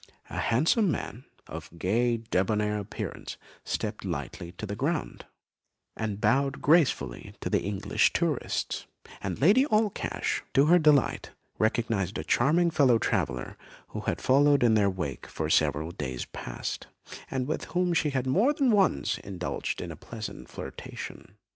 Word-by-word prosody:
A -, -, -3 dB
handsome 160 Hz, -, +3 dB
man, 130 Hz, -5 st, -4 dB, 0.2 s
of -, -, -8 dB
gay 115 Hz, +7 st, +1 dB
débonnaire 105 Hz, 0 st, 0 dB
appearance, 100 Hz, +1 st, -6 dB, 0.3 s
stepped -, -, -3 dB
lightly 85 Hz, -, -5 dB
to 105 Hz, -, -6 dB
the 100 Hz, 0 st, -4 dB
ground, 150 Hz, +8 st, -2 dB, 0.7 s
and 105 Hz, -3 st, -3 dB
bowed 135 Hz, +3 st, +2 dB
gracefully 145 Hz, -, +2 dB
to -, -, -4 dB
the -, -, +3 dB
English 100 Hz, +1 st, +1 dB
tourists; -, -, -1 dB, 0.3 s
and -, -, -3 dB
Lady 200 Hz, -, +6 dB
Allcash, 215 Hz, -3 st, 0 dB
to 135 Hz, -, +6 dB
her 175 Hz, +3 st, +6 dB
delight, 150 Hz, -5 st, +3 dB, 0.3 s
recognised 110 Hz, -3 st, 0 dB
a -, -, -3 dB
charming 170 Hz, +4 st, +3 dB
fellow 130 Hz, -7 st, +5 dB
traveller 60 Hz, -, -1 dB, 0.3 s
who -, -, -5 dB
had -, -, -2 dB
followed 140 Hz, +1 st, +5 dB
in 115 Hz, -2 st, +5 dB
their 105 Hz, -2 st, +4 dB
wake 90 Hz, -9 st, -4 dB
for 80 Hz, 0 st, -3 dB
several 75 Hz, +2 st, +2 dB
days 65 Hz, -6 st, -4 dB
past, -, -, -6 dB, 0.4 s
and 130 Hz, -1 st, -1 dB
with 155 Hz, -, -2 dB
whom 180 Hz, 0 st, 0 dB
she 160 Hz, -2 st, +2 dB
had 130 Hz, -2 st, -1 dB
more 205 Hz, -, +3 dB
than 275 Hz, -4 st, +2 dB
once 195 Hz, -, +2 dB
indulged 90 Hz, -3 st, -4 dB
in -, -, -5 dB
a -, -, -7 dB
pleasant 110 Hz, -3 st, -8 dB
flirtation. 95 Hz, -, -8 dB
120 Hz, 150 wpm, -28 LUFS, 100-155 Hz, 0.7 s, Lady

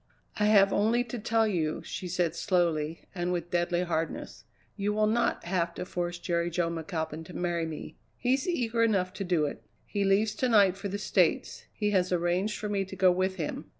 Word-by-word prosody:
"I 210 Hz, -, +3 dB
have 200 Hz, -2 st, +5 dB
only 225 Hz, +4 st, +2 dB
to 245 Hz, 0 st, -6 dB
tell 225 Hz, +1 st, +2 dB
you," 160 Hz, -6 st, -1 dB
she 185 Hz, -, -5 dB
said 175 Hz, -2 st, 0 dB
slowly 165 Hz, -4 st, 0 dB
and 175 Hz, -1 st, -2 dB
with 175 Hz, -1 st, -3 dB
deadly 175 Hz, 0 st, +1 dB
hardness, 165 Hz, -2 st, -3 dB, 0.3 s
"you 205 Hz, 0 st, -1 dB
will 215 Hz, 0 st, +2 dB
not 230 Hz, +3 st, +1 dB
have 170 Hz, -1 st, -1 dB
to -, -, -4 dB
force 175 Hz, -1 st, -3 dB
Jerry 170 Hz, 0 st, -1 dB
Jo 170 Hz, 0 st, 0 dB
McAlpin 160 Hz, -1 st, -4 dB
to 175 Hz, -, -11 dB
marry 170 Hz, -2 st, -1 dB
me; 155 Hz, -1 st, -7 dB, 0.2 s
he's 260 Hz, +4 st, +1 dB
eager 240 Hz, -9 st, 0 dB
enough 195 Hz, -5 st, +2 dB
to 195 Hz, -, -4 dB
do 175 Hz, -5 st, +1 dB
it. 145 Hz, -, -5 dB, 0.2 s
He 200 Hz, -1 st, -1 dB
leaves 200 Hz, +2 st, +3 dB
to 255 Hz, -, +1 dB
night 200 Hz, -5 st, +5 dB
for 195 Hz, +1 st, -5 dB
the 200 Hz, +1 st, -3 dB
States; -, -, +1 dB
he 210 Hz, -1 st, -1 dB
has 185 Hz, -2 st, +2 dB
arranged 180 Hz, +4 st, 0 dB
for 210 Hz, -, -4 dB
me 200 Hz, -1 st, 0 dB
to 190 Hz, 0 st, -9 dB
go 190 Hz, -1 st, +5 dB
with 185 Hz, +1 st, 0 dB
him." 165 Hz, -5 st, -4 dB
185 Hz, 205 wpm, -29 LUFS, 175-210 Hz, 0.3 s, have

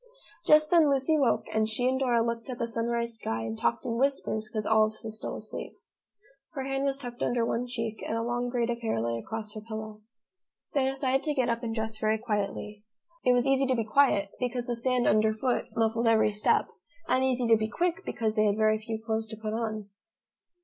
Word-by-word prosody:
Just 305 Hz, 0 st, +6 dB
then 330 Hz, -4 st, +6 dB
Lucy 275 Hz, +3 st, +2 dB
woke 275 Hz, -5 st, +2 dB
and 220 Hz, 0 st, +2 dB
she 245 Hz, +3 st, +2 dB
and 260 Hz, +1 st, +1 dB
Dora 240 Hz, -3 st, +2 dB
looked 235 Hz, +1 st, -3 dB
at 250 Hz, -, -4 dB
the 235 Hz, -, -1 dB
sunrise 235 Hz, 0 st, -1 dB
sky 115 Hz, -, -3 dB
and 110 Hz, 0 st, -4 dB
talked 115 Hz, +1 st, -1 dB
in 230 Hz, 0 st, -2 dB
whispers 260 Hz, -5 st, 0 dB
because 215 Hz, -1 st, -3 dB
Olive 215 Hz, 0 st, +3 dB
was 220 Hz, -1 st, -4 dB
still -, -, -5 dB
asleep. -, -, -7 dB, 0.8 s
Her 270 Hz, -3 st, -3 dB
hand 270 Hz, +1 st, -1 dB
was 275 Hz, -1 st, 0 dB
tucked 245 Hz, -3 st, -7 dB
under 240 Hz, -1 st, +1 dB
one 240 Hz, +2 st, -1 dB
cheek, 230 Hz, -2 st, -4 dB
and 225 Hz, -, -1 dB
a 230 Hz, -, -1 dB
long 240 Hz, +1 st, -1 dB
braid 240 Hz, -1 st, 0 dB
of 235 Hz, 0 st, -4 dB
hair 220 Hz, -, -1 dB
lay 115 Hz, 0 st, -1 dB
across 215 Hz, -, -5 dB
her 215 Hz, -, -7 dB
pillow. 215 Hz, -1 st, -7 dB, 0.7 s
They 265 Hz, -2 st, +2 dB
decided 270 Hz, 0 st, +1 dB
to 300 Hz, -1 st, 0 dB
get 255 Hz, -3 st, +1 dB
up 230 Hz, 0 st, -1 dB
and 225 Hz, -2 st, -3 dB
dress 220 Hz, -1 st, -3 dB
very 215 Hz, 0 st, +2 dB
quietly. 210 Hz, -1 st, -3 dB, 0.4 s
It 250 Hz, -, +5 dB
was 245 Hz, -1 st, +2 dB
easy 270 Hz, 0 st, +3 dB
to 260 Hz, -, +2 dB
be 230 Hz, -, 0 dB
quiet 215 Hz, -5 st, +3 dB
because 245 Hz, -1 st, -2 dB
the 240 Hz, -, -1 dB
sand 250 Hz, +1 st, +1 dB
under 215 Hz, +1 st, +3 dB
foot 250 Hz, +2 st, -1 dB
muffled 225 Hz, +1 st, +1 dB
every 220 Hz, -1 st, +4 dB
step, 210 Hz, 0 st, +2 dB, 0.4 s
and 260 Hz, -, +2 dB
easy 255 Hz, -2 st, +1 dB
to 230 Hz, -1 st, +6 dB
be 215 Hz, 0 st, -1 dB
quick 350 Hz, +8 st, -1 dB
because 220 Hz, -1 st, -2 dB
they 215 Hz, -1 st, +3 dB
had 205 Hz, 0 st, +2 dB
very 215 Hz, 0 st, +3 dB
few 220 Hz, 0 st, -5 dB
clothes 220 Hz, 0 st, -2 dB
to 220 Hz, 0 st, -8 dB
put 215 Hz, 0 st, -4 dB
on. 215 Hz, -2 st, -3 dB
230 Hz, 220 wpm, -28 LUFS, 215-255 Hz, 0.8 s, Just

